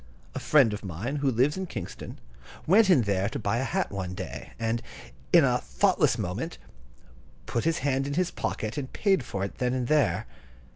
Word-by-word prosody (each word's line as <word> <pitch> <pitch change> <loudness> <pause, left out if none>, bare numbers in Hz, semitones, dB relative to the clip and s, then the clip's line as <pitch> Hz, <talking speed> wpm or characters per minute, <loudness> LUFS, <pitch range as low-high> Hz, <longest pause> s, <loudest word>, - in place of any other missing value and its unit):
A - - -3
friend 135 -8 +4
of 105 - -6
mine, 100 - -4
who 140 -1 +1
lives 130 +7 +2
at 190 -2 -4
Kingston, 100 -6 -7 0.5
went 200 +4 +5
in 145 -10 +5
there 100 -1 0
to 140 - -4
buy 110 -2 -1
a - - 0
hat 190 +7 -1
one 95 -2 -4
day, - - -7
and, 115 0 -1 0.5
in - - +7
a - - +2
thoughtless - - +2
moment, 110 - -4 0.9
put 115 - -2
his 165 0 +2
hand 135 -1 +1
in 140 - -3
his 180 0 +1
pocket 110 +7 -3
and 130 -2 -6
paid 195 - +2
for 95 -5 -4
it 100 - -9
then 125 0 0
and 125 -2 -1
there. 150 +1 +2
130 Hz, 195 wpm, -27 LUFS, 105-150 Hz, 0.9 s, in